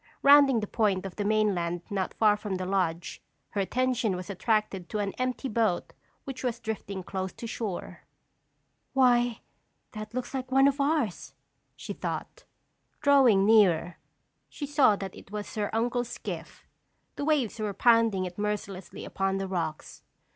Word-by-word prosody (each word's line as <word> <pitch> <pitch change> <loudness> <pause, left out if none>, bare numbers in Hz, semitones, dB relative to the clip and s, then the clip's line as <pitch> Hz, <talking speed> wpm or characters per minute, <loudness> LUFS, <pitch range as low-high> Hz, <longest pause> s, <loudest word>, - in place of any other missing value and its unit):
Rounding 280 -4 +7
the - - -2
point 200 -4 0
of 190 - -6
the 205 - -2
mainland 195 -5 +1
not 195 -2 -2
far 215 -2 +4
from 210 -2 -4
the 185 0 -3
lodge, 180 -3 -1 0.3
her 200 - -1
attention 245 -1 0
was 180 +3 -6
attracted 200 -2 -1
to - - -3
an 200 -2 -2
empty 255 +1 -1
boat 220 -6 0 0.3
which 270 -1 -7
was 240 -2 -1
drifting 200 -4 -5
close 190 0 -4
to - - -8
shore. 220 -5 -5 0.9
"Why, 245 -3 +3 0.5
that 215 0 -8
looks 255 +1 -4
like 260 -1 -4
one 270 +1 +6
of 280 0 +1
ours," 280 - -1 0.4
she - - -6
thought. - - -5 0.6
Drawing 265 -9 +5
nearer, 185 -6 +4 0.5
she 290 - -6
saw 280 -7 +4
that 195 -2 -6
it - - -14
was 210 0 -6
her 210 -2 -1
uncle's 240 +2 0
skiff. - - -7 0.5
The - - -4
waves 275 -8 +1
were 210 -1 -1
pounding 230 -3 +3
it 180 +2 -8
mercilessly 205 -3 -4
upon 195 0 -1
the 195 0 -3
rocks. 165 -5 -4
215 Hz, 155 wpm, -28 LUFS, 190-245 Hz, 0.9 s, Rounding